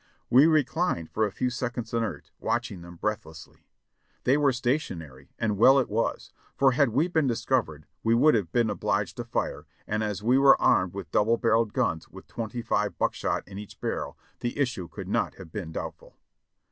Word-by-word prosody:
We 135 +6 +7
reclined 155 - +1
for 110 0 +1
a - - -7
few 125 +5 -1
seconds 120 -1 -4
inert, 115 -1 -3
watching 115 -6 -2
them 85 0 -11
breathlessly. 85 -5 -6 0.6
They 130 - +4
were 145 -2 +3
stationary, 95 - -3
and 105 -3 -1
well 130 +4 +7
it 135 - +1
was, 115 +2 -2 0.2
for 135 -1 +4
had 135 0 +3
we 140 +9 +2
been 160 -5 +1
discovered 115 - -1 0.2
we 115 +1 +3
would 150 +6 +5
have 100 -7 0
been 115 -3 +2
obliged 100 -1 -1
to 120 - -3
fire, 120 0 -3 0.2
and 105 +1 -1
as 105 -2 -3
we 125 +4 +4
were 135 0 +6
armed 90 0 +3
with 100 -4 -7
double 115 +3 +3
barreled 115 -2 +2
guns 80 - -1
with - - -12
twenty 115 +1 -5
five - - 0
buckshot - - -1
in 95 +1 -8
each 105 - -11
barrel, - - -3 0.2
the 120 +2 -3
issue 120 -11 -1
could - - -8
not - - 0
have 80 - -12
been 90 -5 -5
doubtful. - - -7
115 Hz, 185 wpm, -27 LUFS, 100-130 Hz, 0.6 s, We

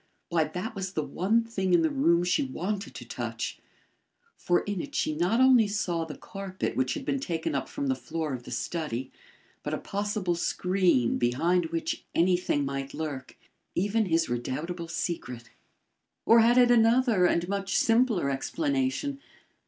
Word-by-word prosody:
Why, 165 -2 +2
that 180 +9 -5
was 190 -2 -5
the 155 - -1
one 210 +10 +1
thing 190 -5 0
in - - +4
the 320 - +2
room 175 -12 +3
she 180 +11 +2
wanted 210 -6 -4
to - - -8
touch; - - -4 0.8
for 175 0 +1
in 205 -3 -3
it - - -8
she 155 - 0
not 180 +9 +1
only 255 -4 +6
saw 175 -5 -1
the 150 -3 -8
carpet 195 -1 -5
which 130 0 0
had 275 - -6
been 275 - 0
taken 170 - -2
up - - -2
from 285 -1 -4
the 270 - +2
floor 160 - -4
of 125 - -4
the - - -12
study, 140 -7 -3 0.5
but - - -2
a - - -3
possible 205 -2 -2
screen 175 -7 +1
behind 165 +9 +2
which 165 0 -3
anything 175 -4 +2
might 135 0 -4
lurk 145 -5 -5 0.4
even 205 +3 +1
his 165 -1 +2
redoubtable 155 +8 -3
secret. 125 -8 -4 0.7
Or 230 - +7
had 235 +2 +5
it 245 -1 +6
another 230 -4 +4
and 170 0 +1
much 195 -1 -2
simpler 225 - +3
explanation? 275 - -1
180 Hz, 165 wpm, -28 LUFS, 160-225 Hz, 0.8 s, Or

